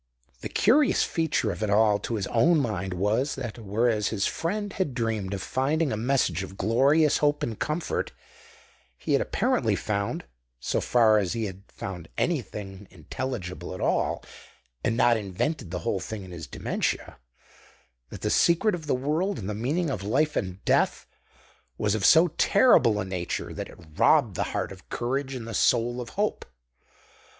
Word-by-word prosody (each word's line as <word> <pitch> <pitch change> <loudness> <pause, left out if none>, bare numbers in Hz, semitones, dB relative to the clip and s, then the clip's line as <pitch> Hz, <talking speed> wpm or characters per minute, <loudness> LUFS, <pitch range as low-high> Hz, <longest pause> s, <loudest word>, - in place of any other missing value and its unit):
The - - -6
curious 265 +6 +3
feature 160 -9 0
of - - -7
it 110 - 0
all 105 0 +4
to 115 - -3
his 100 -3 -2
own 155 +8 +3
mind 95 -8 -2
was, 105 +9 0
that 120 0 -6
whereas 110 0 +1
his 100 -3 -1
friend 205 +4 -2
had 150 -10 -2
dreamed 110 -5 -1
of 100 -1 -3
finding 140 +5 0
a - - 0
message 125 -2 +1
of 95 0 -8
glorious 140 +9 +3
hope 145 0 +1
and 110 -3 -3
comfort, 155 +2 -2 0.9
he - - -2
had - - +4
apparently - - +1
found 100 -1 -2 0.3
(so - - -1
far 110 -3 +4
as 95 -4 -1
he 115 - -2
had 95 -1 -7
found 90 -4 -7
anything 105 - -3
intelligible 90 - -5
at - - -8
all, - - 0 0.6
and 115 - 0
not 120 -1 +4
invented 105 - -3
the 90 - -3
whole 95 - 0
thing 105 +1 -6
in 95 - -11
his 85 -4 -7
dementia) - - -3 0.9
that - - -9
the - - 0
secret 175 +5 +3
of 160 -4 -5
the 140 - +2
world, 155 +9 -1
and 95 - -5
the 105 - -2
meaning 140 - -1
of 105 - -3
life 145 +10 +1
and 95 -2 -3
death, - - +2 0.7
was 105 -1 +1
of 110 -3 -1
so 170 +2 +7
terrible 115 - +5
a 95 - -2
nature 90 -2 -4
that - - -6
it - - -14 0.2
robbed - - +4
the - - 0
heart - - -2
of 95 -1 -13
courage 135 +3 -2
and 115 -3 -6
the 115 - -6
soul 120 +1 +2
of 120 - -7
hope. 210 +1 0
115 Hz, 175 wpm, -26 LUFS, 100-145 Hz, 0.9 s, so